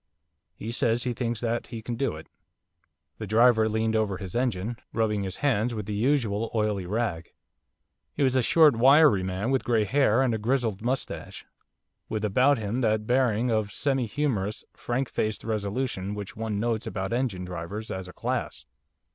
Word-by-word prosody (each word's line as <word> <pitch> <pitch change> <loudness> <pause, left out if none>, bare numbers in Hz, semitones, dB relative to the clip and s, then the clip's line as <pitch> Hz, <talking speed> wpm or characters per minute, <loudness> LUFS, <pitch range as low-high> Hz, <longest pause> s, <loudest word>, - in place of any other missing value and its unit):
He 110 - -6
says 120 0 +1
he 125 - -1
thinks 115 -2 -3
that 120 0 -1
he 115 -2 -7
can 120 - -4
do 120 - -1
it.' 80 - -10 0.9
The 110 - -5
driver 110 +1 +4
leaned 110 +1 0
over 105 -4 0
his 95 -3 -7
engine, 120 -2 -1 0.2
rubbing 105 -2 0
his 95 -1 -3
hands 120 -3 +1
with 105 -2 -4
the 105 - -4
usual 115 -2 +1
oily 105 -4 0
rag. 100 -5 -2 0.8
He 145 - +1
was 130 -1 +2
a 130 - +4
short, 150 +2 +5
wiry 135 -2 +6
man 95 +6 -2
with 135 - +1
grey 115 -3 +2
hair 130 +1 +3
and 125 -3 +1
a 110 - -1
grizzled 115 -3 0
moustache, 125 +4 -3 0.6
with 110 -1 -2
about 130 +7 +3
him 110 +3 -2
that 110 -2 +1
bearing 120 -1 +2
of 110 -2 0
semi 135 -2 0
humorous, 110 -6 -2
frank 125 +2 -2
faced 110 -2 -2
resolution 105 -1 -2
which 105 +2 -7
one 110 -2 -3
notes 115 0 -1
about 95 +1 -3
engine 120 -8 -1
drivers 90 +5 -6
as 95 -1 -5
a 90 - -11
class. - - -3
110 Hz, 175 wpm, -27 LUFS, 105-125 Hz, 0.9 s, wiry